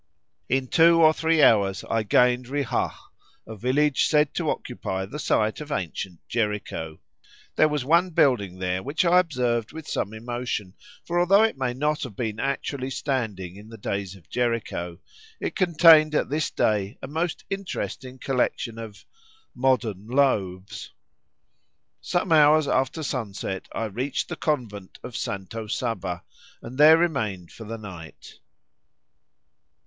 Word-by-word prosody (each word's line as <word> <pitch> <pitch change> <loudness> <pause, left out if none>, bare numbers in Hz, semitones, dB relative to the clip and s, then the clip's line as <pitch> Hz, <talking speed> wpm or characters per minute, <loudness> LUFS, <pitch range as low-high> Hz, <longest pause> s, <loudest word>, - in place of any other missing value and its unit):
In 130 +1 +1
two 165 +3 +5
or 160 -1 +6
three 160 -1 +2
hours 100 -3 +4
I 115 - +1
gained 125 +3 +3
Rihah, 140 -2 -1 0.5
a 110 - -8
village 135 +6 +2
said 150 -1 +2
to 165 -3 -1
occupy 95 -6 -3
the 140 +10 -7
site 110 -3 0
of 150 0 -8
ancient 90 - -4
Jericho. 105 -8 -3 0.6
There 155 - +5
was 150 -4 -2
one 170 +5 +4
building 120 - +2
there 90 0 -2
which 145 - -1
I 175 +1 +6
observed 125 -9 -1
with 160 -1 -8
some 100 - -2
emotion, 115 -3 -4 0.3
for 175 +1 0
although 195 +4 +5
it 225 - +1
may 130 -2 -2
not 150 +3 0
have 125 -7 -6
been 110 -2 -3
actually 135 0 -2
standing 110 -10 -3
in 105 +2 -13
the 115 - -10
days 100 -1 -4
of 90 -3 -18
Jericho, 115 -8 -2 0.4
it - - -4
contained 165 -4 +6
at - - +1
this 155 +1 0
day 105 -2 0
a - - -4
most 160 +4 -3
interesting 135 -9 -5
collection 125 -3 -1
of—modern 125 - -3
loaves. 100 -8 -1 1.1
Some 175 0 -1
hours 155 -1 +6
after 135 +4 0
sunset 100 -8 -4
I 115 - -3
reached 125 +7 -3
the - - -3
convent 110 -11 -3
of 125 - -8
Santa 105 +1 -5
Saba, 100 -8 -3 0.4
and 125 +4 -10
there 155 +2 +9
remained 110 - -1
for 115 - -10
the 115 +2 -6
night. 90 -7 -11
125 Hz, 145 wpm, -25 LUFS, 105-150 Hz, 1.1 s, there